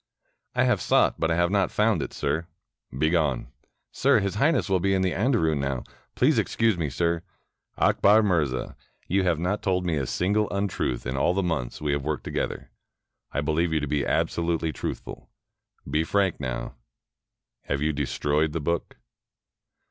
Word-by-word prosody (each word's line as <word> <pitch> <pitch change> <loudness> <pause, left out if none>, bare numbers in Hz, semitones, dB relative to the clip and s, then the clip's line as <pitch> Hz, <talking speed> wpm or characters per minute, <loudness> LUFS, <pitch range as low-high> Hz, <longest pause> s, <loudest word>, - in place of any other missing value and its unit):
"I - - +3
have - - +2
sought, - - +3
but 80 - +1
I 80 - +2
have 85 +1 +2
not 100 -1 +2
found - - +2
it, - - -4
sir." 80 +2 -2 0.4
"Begone." 75 -1 0 0.2
" - - -51
Sir, - - +3
His 100 -1 -1
Highness 140 +4 +2
will 95 -2 +2
be 95 +2 +1
in 95 - +1
the 95 - +1
andarun 95 - +1
now. 70 -2 -2 0.3
Please - - +3
excuse 115 -2 +1
me, 80 -4 -2
sir." 85 +5 0 0.3
" - - -48
Akbar 105 +2 +4
Mirza, 75 -10 0 0.3
you 95 +2 +2
have 85 -3 +2
not 90 +6 -1
told 90 -2 0
me 85 -3 0
a 70 -3 -2
single 105 - +1
untruth 100 -11 -2
in 65 +2 -2
all 85 +6 +2
the 100 - +1
months 80 -8 -2
we 75 -1 0
have 70 -1 -1
worked 75 +1 -2
together. - - -4 0.6
I - - -1
beUeve 80 +3 0
you 80 - +2
to 75 - -2
be 70 0 0
absolutely 85 -1 0
truthful. - - -6 0.6
Be 75 +4 +1
frank 95 +1 +1
now. 65 -1 -4 0.9
Have 70 +1 -1
you 80 0 +1
destroyed 75 +2 0
the 85 - -1
book?" 85 +3 -2
85 Hz, 180 wpm, -26 LUFS, 75-95 Hz, 0.9 s, Akbar